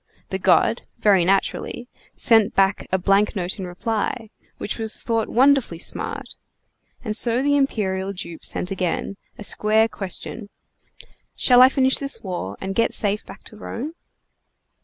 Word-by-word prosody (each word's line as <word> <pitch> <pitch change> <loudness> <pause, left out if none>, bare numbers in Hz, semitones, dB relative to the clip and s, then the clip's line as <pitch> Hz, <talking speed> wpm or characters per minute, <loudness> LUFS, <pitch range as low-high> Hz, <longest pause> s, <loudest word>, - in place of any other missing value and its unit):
The - - -3
god - - +3 0.2
(very 195 -4 +4
naturally) 195 +5 -1 0.3
sent 225 -3 +3
back 195 0 +2
a 190 - +3
blank 195 +4 +2
note 185 0 -2
in 185 - -4
reply, 220 +4 -3 0.3
which 210 - -4
was 220 -1 -5
thought 225 -2 -1
wonderfully 265 -7 +3
smart; 170 - -4 0.7
and 215 -1 -2
so 240 +3 +3
the 285 0 +2
imperial 195 -8 0
dupe 170 -3 -7
sent 180 - -1
again, 190 +1 -2 0.2
a - - -8
square 215 +2 +2
question: 205 +1 -5 0.9
"Shall 250 -1 +5
I 255 - +9
finish 265 -1 +2
this 275 0 0
war 175 - -5
and 190 0 -4
get 230 +3 +2
safe 205 0 0
back - - -12
to 215 - -12
Rome?" 260 +8 -6
210 Hz, 150 wpm, -22 LUFS, 190-235 Hz, 0.9 s, I